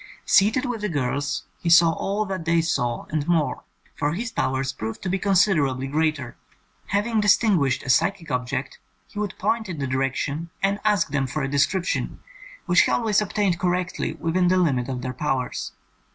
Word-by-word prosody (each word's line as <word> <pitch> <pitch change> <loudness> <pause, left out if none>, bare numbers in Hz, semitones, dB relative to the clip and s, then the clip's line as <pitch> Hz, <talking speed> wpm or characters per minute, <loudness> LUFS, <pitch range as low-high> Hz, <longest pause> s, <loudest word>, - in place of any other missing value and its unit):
Seated 220 +6 +4
with 245 -4 -3
the 210 - -1
girls, 140 - -2 0.2
he 170 - -2
saw 170 0 +7
all 200 +5 -2
that 190 -4 -4
they 170 0 +3
saw, 125 -8 -1
and 155 -2 -1
more, 155 -7 +1 0.3
for 145 +1 -1
his 230 +6 -4
powers 130 - -1
proved 110 +1 -6
to 190 - -2
be 190 +2 0
considerably 175 -10 +2
greater. 150 -3 -1 0.5
Having 215 +2 +1
distinguished 195 - +3
a - - -7
psychic 165 +1 +1
object, 125 +1 -3 0.3
he 205 - -9
would 205 -2 -3
point 225 -3 -1
in 170 - -5
the 140 - -2
direc 130 0 -1
tion 155 +4 -3
and 200 +1 +1
ask 210 -6 +2
them 140 -2 0
for 150 +3 -3
a - - 0
description, 145 +6 0 0.5
which - - +5
he - - +2
always 220 -3 +2
obtained 200 -3 0
correctly 180 0 -1
within 175 +2 0
the 185 +1 +3
limit 135 -8 +1
of 125 -2 -4
their 130 0 -3
powers. 125 -9 -2
165 Hz, 180 wpm, -24 LUFS, 135-195 Hz, 0.5 s, saw